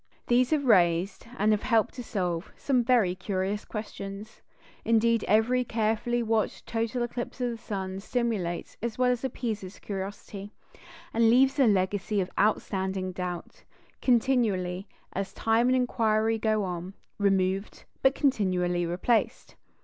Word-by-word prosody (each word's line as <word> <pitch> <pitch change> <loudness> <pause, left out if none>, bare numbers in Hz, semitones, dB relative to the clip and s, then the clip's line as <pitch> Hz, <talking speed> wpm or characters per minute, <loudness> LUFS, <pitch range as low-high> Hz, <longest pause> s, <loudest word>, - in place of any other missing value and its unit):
These 245 +1 +3
have 300 -3 +1
raised, 180 -2 +3
and 215 +1 +3
have 210 0 +2
helped 230 -4 +2
to 245 - -7
solve, 180 -5 -2
some 255 -3 +1
very 230 -7 +3
curious 190 +2 -2
questions. 210 -1 -7 0.4
Indeed, 230 -1 +3
every 230 +5 +3
carefully 225 +1 0
watched 220 -1 -1
total 230 +1 -1
eclipse 240 +1 -5
of 245 -1 0
the 230 - -5
sun 195 -4 -4
stimulates 210 -6 -2
as 235 -1 -3
well 250 0 +3
as 245 0 -2
appeases 220 -7 -4
curiosity, 200 +1 -6 0.6
and 230 0 +4
leaves 265 +4 +4
a 265 - +6
legacy 200 +1 +1
of 185 - -2
outstanding 190 -2 0
doubt, 180 -1 -6 0.4
continually, 220 -7 +1 0.3
as 195 0 -3
time 225 +2 +2
and 255 - +4
inquiry 225 -3 +1
go 215 -1 +1
on, 180 +1 -5 0.2
removed, 195 0 0 0.2
but 265 +1 +4
continually 180 - +1
replaced. 185 +7 0
215 Hz, 135 wpm, -28 LUFS, 190-235 Hz, 0.6 s, a